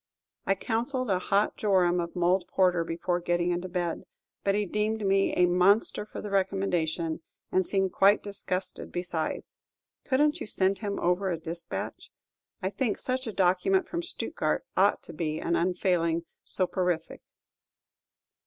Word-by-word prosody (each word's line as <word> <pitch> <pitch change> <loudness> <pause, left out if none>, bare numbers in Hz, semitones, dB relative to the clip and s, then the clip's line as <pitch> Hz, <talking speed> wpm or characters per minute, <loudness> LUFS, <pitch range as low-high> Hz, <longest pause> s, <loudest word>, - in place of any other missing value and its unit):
I 195 - +3
counselled 240 +3 -2
a 185 - +2
hot 200 +3 +1
jorum 180 -4 +2
of 170 0 -4
mulled 180 +1 +2
porter 180 -3 +2
before 170 +2 -2
getting 175 0 0
into 175 +1 -3
bed; 175 -2 -2 0.4
but 200 0 +2
he 210 0 +1
deemed 210 +2 -1
me 195 0 +3
a 180 - +5
monster 190 +4 +3
for - - -7
the 210 - -6
recommendation, 175 -4 0 0.3
and 185 - +3
seemed 190 0 0
quite 200 +2 +4
disgusted 190 -2 -2
besides. 175 -2 -4 0.4
Could 260 -1 0
n't 300 +2 +2
you - - -4
send 190 -1 +1
him 205 -2 -3
over 180 +2 +1
a 170 - -1
despatch? 165 +1 -6 0.5
I 190 - 0
think 235 -2 -1
such 255 -1 -3
a - - -2
document 195 - +2
from 340 - -3
Stuttgard 345 - +2
ought - - +3
to - - -8
be 155 -2 -2
an 170 - 0
unfailing 170 -2 +1 0.2
soporific. 180 -3 0
185 Hz, 155 wpm, -28 LUFS, 175-205 Hz, 0.5 s, a